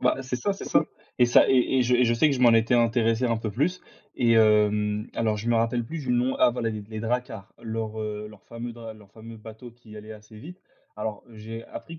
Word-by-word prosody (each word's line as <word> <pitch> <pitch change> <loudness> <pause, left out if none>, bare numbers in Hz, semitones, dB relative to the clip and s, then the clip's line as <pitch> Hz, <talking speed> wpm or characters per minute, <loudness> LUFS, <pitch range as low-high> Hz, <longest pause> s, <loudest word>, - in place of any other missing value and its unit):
Bah, - - +2
c'est 125 -1 -4
ça, 200 +11 -1
c'est 195 - -8
ça - - +2 0.3
et 125 - +5
ça 120 - +5
et - - +3
et 130 +1 +2
et - - +4
je 125 +1 +2
et 125 0 +4
je 120 0 +2
sais 150 +6 +3
que 140 - 0
je 125 - -4
m'en 120 -2 +6
étais 115 +2 +3
intéressé 115 0 +2
un 115 -1 0
peu 110 -1 -4
plus 155 - -1 0.4
et 120 -2 +3
hem, 105 -1 +3
alors, 110 -2 0
je 110 +3 -5
me 120 - +2
rappelle 115 +1 0
plus 160 +6 -6
du - - -1
nom, 125 +2 +1
ah, - - +5
voilà, 115 -2 -2
les 110 -1 -5
d 100 - -13
les 110 - -5
Drakkars, 115 -3 -4
leurs, 110 -1 -4
heu, 105 0 -5
leurs 105 -2 -16
fameux 115 0 -7
dr 115 -1 -10
leurs 105 -2 -18
fameux 115 0 -11
bateaux 110 +2 -12
qui 115 -2 -16
allaient 110 +1 -10
assez 105 0 -15
vite. 180 - -11 0.4
Alors, 105 0 -5
j'ai 110 +1 -9
appris 165 -1 -10
115 Hz, 260 wpm, -25 LUFS, 110-125 Hz, 0.4 s, m'en